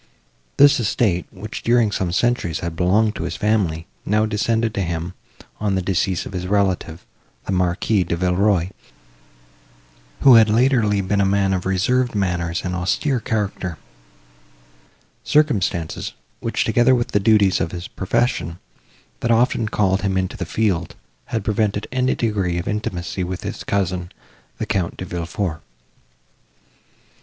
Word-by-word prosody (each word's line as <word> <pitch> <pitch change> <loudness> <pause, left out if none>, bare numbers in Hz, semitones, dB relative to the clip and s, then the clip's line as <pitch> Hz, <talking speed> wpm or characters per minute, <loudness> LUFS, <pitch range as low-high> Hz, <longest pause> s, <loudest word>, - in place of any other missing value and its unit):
This 140 -1 +6
estate, 100 -4 0
which, 105 +2 -8
during 120 -2 +3
some 95 -3 -1
centuries, 95 -5 0
had 85 -1 -4
belonged 105 +5 +2
to - - -3
his - - -3
family, 95 -7 0 0.2
now 105 +2 +2
descended 110 +1 0
to 100 - -2
him, 85 0 -3 0.5
on 105 -2 0
the 95 - 0
decease 95 -1 0
of - - -8
his 90 0 -3
relative, 95 -4 0 0.4
the - - -3
Marquis 90 +2 +1
De 85 - -2
Villeroi, 90 0 +2 1.5
who 135 -2 +8
had 115 -2 +7
been 105 - +1
latterly 115 -4 +3
a 100 +1 +1
man 95 0 +2
of 95 0 -2
reserved 120 +6 +1
manners 85 -4 -1
and 90 - -2
austere 105 +9 0
character; 100 -6 -3 1.5
circumstances, 100 - 0 0.3
which, - - -1
together 120 +2 +4
with 120 -1 -1
the 105 - +2
duties 100 -2 +3
of 80 - -1
his 85 0 -6
profession, 95 -5 -1 0.6
that 120 - -2
often 115 -1 +2
called 95 -2 +1
him 95 -2 0
into 95 +1 -1
the - - -5
field, 95 -6 -1 0.3
had 110 - -3
prevented 105 -1 0
any 130 0 +1
degree 100 -6 -1
of 85 - -4
intimacy 95 -5 -3
with 90 0 -5
his - - -5
cousin, 90 -3 -1 0.5
the - - -3
Count 90 -4 -2
De 95 - -5
Villefort. 85 -1 -3
100 Hz, 145 wpm, -21 LUFS, 90-110 Hz, 1.5 s, who